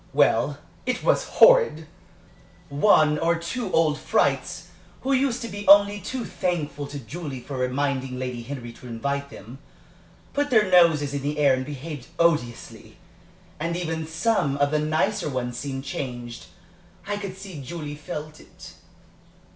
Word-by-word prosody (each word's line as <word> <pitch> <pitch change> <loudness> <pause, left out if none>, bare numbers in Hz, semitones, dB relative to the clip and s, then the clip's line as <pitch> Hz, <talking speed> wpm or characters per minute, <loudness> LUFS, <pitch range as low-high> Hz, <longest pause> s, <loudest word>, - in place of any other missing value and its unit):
Well, - - +3 0.3
it - - -1
was - - +2
horrid! - - +5 0.8
One 150 0 +4
or 170 +1 +2
two 185 +6 -4
old 155 -2 +2
frights, - - 0 0.3
who 270 +1 0
used 260 -2 +1
to - - -3
be 205 0 -7
only 205 +1 +7
too 245 +6 -4
thankful 155 -6 -3
to 145 - -7
Julie 140 +1 -6
for 135 +3 -8
reminding 130 0 -1
Lady 125 -2 -4
Henry 120 -1 -7
to 125 - -13
invite 140 +4 -3
them, 125 +1 -11 0.7
put 290 0 0
their 215 -5 +3
noses 160 -5 +5
in 140 - -2
the 145 +2 -2
air 145 -3 +4
and 130 0 -1
behaved 145 -1 -7
odiously. 150 -9 -1 0.6
And 170 +2 -2
even 160 -2 -3
some 160 -4 0
of 145 0 +2
the 155 - +2
nicer 155 +5 0
ones 125 -2 -3
seemed 135 -2 -4
changed 120 -4 -6 0.6
I 205 +1 -2
could 195 -2 -6
see 190 -6 -8
Julie 150 +2 -6
felt 150 +1 -7
it." - - -14
150 Hz, 150 wpm, -24 LUFS, 135-180 Hz, 0.8 s, only